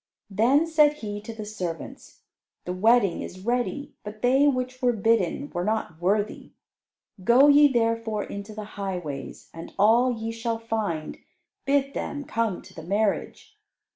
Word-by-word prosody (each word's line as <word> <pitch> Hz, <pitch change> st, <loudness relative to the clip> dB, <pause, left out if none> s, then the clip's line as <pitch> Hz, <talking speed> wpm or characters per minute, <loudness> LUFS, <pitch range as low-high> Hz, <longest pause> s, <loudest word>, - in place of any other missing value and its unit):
Then 250 Hz, +10 st, +3 dB
said 305 Hz, -2 st, +4 dB
he 205 Hz, -7 st, -6 dB
to 220 Hz, -, -8 dB
the 220 Hz, -1 st, -7 dB
servants, 180 Hz, -6 st, -7 dB, 0.4 s
"The 180 Hz, -, -3 dB
wedding 210 Hz, 0 st, +3 dB
is 185 Hz, -, -8 dB
ready, 245 Hz, +4 st, -1 dB
but 210 Hz, +1 st, -9 dB
they 265 Hz, +4 st, +4 dB
which 255 Hz, -2 st, -1 dB
were 245 Hz, -1 st, +3 dB
bidden 225 Hz, -, +1 dB
were 175 Hz, -1 st, -2 dB
not 210 Hz, -6 st, -2 dB
worthy. 205 Hz, +4 st, -1 dB, 0.7 s
Go 245 Hz, +7 st, +6 dB
ye 290 Hz, 0 st, +7 dB
therefore 230 Hz, -3 st, 0 dB
into 200 Hz, +1 st, -8 dB
the 215 Hz, -, -5 dB, 0.2 s
highways, 175 Hz, -8 st, -5 dB
and 165 Hz, 0 st, -10 dB
all 235 Hz, +5 st, +4 dB
ye 225 Hz, -1 st, -4 dB
shall 230 Hz, 0 st, -2 dB
find, 215 Hz, -9 st, -3 dB, 0.5 s
bid 275 Hz, 0 st, +1 dB
them 290 Hz, 0 st, -4 dB
come 225 Hz, -7 st, -2 dB
to -, -, -15 dB
the 160 Hz, -, -9 dB
marriage." 210 Hz, -, -2 dB
225 Hz, 150 wpm, -25 LUFS, 200-255 Hz, 0.7 s, ye